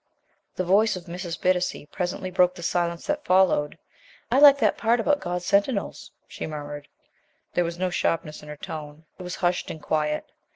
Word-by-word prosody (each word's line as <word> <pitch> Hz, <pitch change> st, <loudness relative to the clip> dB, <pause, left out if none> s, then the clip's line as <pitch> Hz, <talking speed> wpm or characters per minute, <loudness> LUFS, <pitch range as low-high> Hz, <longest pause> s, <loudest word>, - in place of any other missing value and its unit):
The 185 Hz, -, -1 dB
voice 205 Hz, +4 st, +3 dB
of 180 Hz, -, -8 dB
Mrs. 175 Hz, 0 st, -6 dB
Bittacy 180 Hz, -4 st, 0 dB
presently 185 Hz, +1 st, -3 dB
broke 180 Hz, 0 st, +3 dB
the 175 Hz, -, -9 dB
silence 170 Hz, 0 st, -1 dB
that 295 Hz, 0 st, -1 dB
followed. 185 Hz, -5 st, +3 dB, 0.5 s
"I -, -, +4 dB
like 285 Hz, -1 st, +9 dB
that -, -, +2 dB
part 235 Hz, +1 st, +2 dB
about 290 Hz, +6 st, +2 dB
God's 175 Hz, -3 st, -4 dB
sentinels," 200 Hz, +3 st, 0 dB, 0.2 s
she -, -, -6 dB
murmured. 145 Hz, -1 st, -7 dB, 0.7 s
There 175 Hz, -, +2 dB
was 170 Hz, 0 st, -4 dB
no 185 Hz, 0 st, -1 dB
sharpness 165 Hz, -3 st, -1 dB
in 150 Hz, -, -12 dB
her 150 Hz, -, -7 dB
tone; 155 Hz, 0 st, -8 dB
it -, -, -8 dB
was 180 Hz, 0 st, -5 dB
hushed 175 Hz, 0 st, 0 dB
and 160 Hz, -, -6 dB
quiet. 150 Hz, 0 st, -1 dB
175 Hz, 180 wpm, -25 LUFS, 160-190 Hz, 0.7 s, like